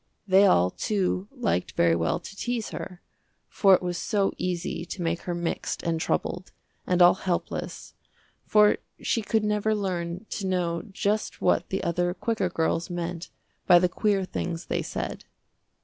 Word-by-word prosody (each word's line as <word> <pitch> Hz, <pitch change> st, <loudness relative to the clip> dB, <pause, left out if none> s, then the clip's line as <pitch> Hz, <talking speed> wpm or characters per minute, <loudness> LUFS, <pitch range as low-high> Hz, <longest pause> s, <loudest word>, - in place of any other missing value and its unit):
They 195 Hz, +1 st, +6 dB
all, 90 Hz, +1 st, +4 dB
too, 195 Hz, -2 st, -1 dB
liked 240 Hz, -, -1 dB
very 85 Hz, -1 st, +3 dB
well 85 Hz, 0 st, 0 dB
to -, -, -11 dB
tease 240 Hz, +1 st, -2 dB
her, 180 Hz, -1 st, -7 dB, 0.4 s
for 195 Hz, -2 st, +5 dB
it -, -, -3 dB
was 175 Hz, -1 st, -2 dB
so 200 Hz, -3 st, 0 dB
easy 175 Hz, -2 st, -3 dB
to 180 Hz, +1 st, -6 dB
make 165 Hz, 0 st, 0 dB
her 175 Hz, -, 0 dB
mixed 170 Hz, -1 st, -3 dB
and 165 Hz, -1 st, -1 dB
troubled, 180 Hz, +2 st, -2 dB, 0.4 s
and 180 Hz, -1 st, +4 dB
all 175 Hz, -, +8 dB
helpless, 180 Hz, -2 st, -4 dB, 0.5 s
for 210 Hz, -1 st, +5 dB, 0.2 s
she 230 Hz, -, 0 dB
could 220 Hz, 0 st, 0 dB
never 210 Hz, +1 st, +1 dB
learn 180 Hz, -1 st, -3 dB
to 195 Hz, -, -3 dB
know 175 Hz, -2 st, 0 dB
just 205 Hz, +2 st, -1 dB
what -, -, +2 dB
the 195 Hz, -, -2 dB
other 175 Hz, +1 st, 0 dB
quicker 220 Hz, -5 st, -1 dB
girls 165 Hz, 0 st, -1 dB
meant 175 Hz, -1 st, -4 dB, 0.4 s
by 175 Hz, -, +8 dB
the 180 Hz, +1 st, +4 dB
queer 195 Hz, +1 st, 0 dB
things 170 Hz, -2 st, -4 dB
they -, -, -1 dB
said. -, -, -5 dB
180 Hz, 165 wpm, -26 LUFS, 170-200 Hz, 0.5 s, all